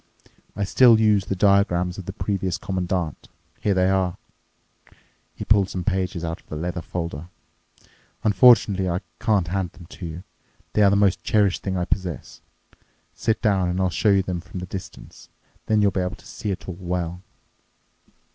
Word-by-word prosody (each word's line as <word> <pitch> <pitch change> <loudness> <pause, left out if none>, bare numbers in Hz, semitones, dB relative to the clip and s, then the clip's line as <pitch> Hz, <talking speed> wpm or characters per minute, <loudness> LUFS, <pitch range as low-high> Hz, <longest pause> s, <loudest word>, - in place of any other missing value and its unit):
I 100 - -1
still 115 +3 +6
use 105 -3 +3
the 95 - -2
diagrams 90 -2 +2
of 95 - -9
the - - -3
previous 95 -3 -2
Commandant. 90 -4 -3 0.3
Here 100 -2 +1
they 90 0 +3
are." 95 -2 +1 1.2
He - - -6
pulled 100 -3 +3
some 90 - -4
pages 95 -3 -1
out 85 +1 -5
of - - -35
the - - -5
leather 85 +2 -3
folder. 85 -1 -5 1.0
"Unfortunately 105 -4 +5
I 90 +2 -1 0.2
can't 100 -6 +1
hand 95 -2 -2
them 85 - -13
to 90 0 -8
you. 80 +3 -8 0.5
They 105 - +2
are 100 - +6
the 100 - +3
most 100 -2 +2
cherished 100 -4 +2
thing 95 -1 -2
I 90 - -1
possess. 90 -9 -4 0.7
Sit 110 +1 -1
down, 95 -5 +2
and 90 +1 -2
I'll 95 -1 +1
show 105 - +1
you 100 -1 +4
them 90 -2 -3
from 85 +2 -8
this 90 - -7
distance. 95 - -9 0.4
Then 110 -1 +3
you'll 100 - +4
be 95 - -1
able 90 0 -3
to - - -20
see 105 - -6
it 95 - -4
all 90 -2 -6
well." 90 -1 -3
95 Hz, 180 wpm, -23 LUFS, 90-100 Hz, 1.2 s, still